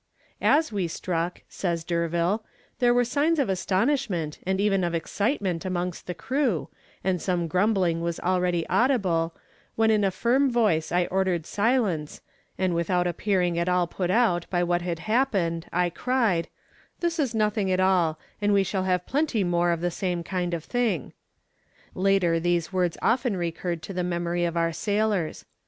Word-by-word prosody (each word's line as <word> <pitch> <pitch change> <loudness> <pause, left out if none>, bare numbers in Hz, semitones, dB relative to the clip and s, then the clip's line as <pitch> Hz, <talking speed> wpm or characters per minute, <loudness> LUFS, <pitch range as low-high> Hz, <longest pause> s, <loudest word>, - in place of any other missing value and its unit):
"As 310 -1 +3
we 195 -4 -1
struck," 170 +1 -3
says 170 -3 -2
D'Urville, 170 +5 0 0.4
"there 245 -1 +4
were 245 0 +3
signs 290 +7 +1
of 275 -8 +1
astonishment 190 - 0
and 190 0 +1
even 195 -2 +2
of 170 -1 0
excitement 195 - -1
amongst 180 -1 -3
the 180 - -4
crew, 235 - -1 0.3
and 180 -2 0
some 175 -3 0
grumbling 180 -2 +1
was 170 0 -2
already 180 -2 0
audible, 185 -11 +1 0.4
when 220 0 +3
in 210 -1 +3
a 195 - +3
firm 245 +8 +2
voice 210 -10 +1
I 175 +1 +2
ordered 185 -3 0
silence, 205 - 0 0.4
and 185 -2 +1
without 175 +1 +1
appearing 180 -1 0
at 170 +1 0
all 180 -1 +2
put 175 +1 -3
out 185 -5 +2
by 175 -1 +1
what 175 0 +1
had 175 -1 -2
happened, 175 -4 0
I 180 0 +1
cried, 230 -6 +1 0.5
'This 340 -1 -1
is 260 -6 0
nothing 210 -2 +1
at 185 - +1
all, 180 -4 +3 0.2
and 205 0 +2
we 200 -1 +4
shall 190 0 -2
have 180 -1 0
plenty 275 -7 0
more 175 -1 +1
of 170 -1 0
the 175 0 0
same 175 -1 -2
kind 175 -1 -2
of 165 - -6
thing.' 235 - -1 0.8
Later 185 -3 +2
these 175 +1 0
words 180 -2 0
often 235 -3 +1
recurred 170 -1 -3
to 195 - -6
the 180 -1 -1
memory 175 0 -1
of 170 0 -2
our 165 0 +1
sailors. 205 -2 -1
180 Hz, 170 wpm, -26 LUFS, 170-210 Hz, 0.8 s, there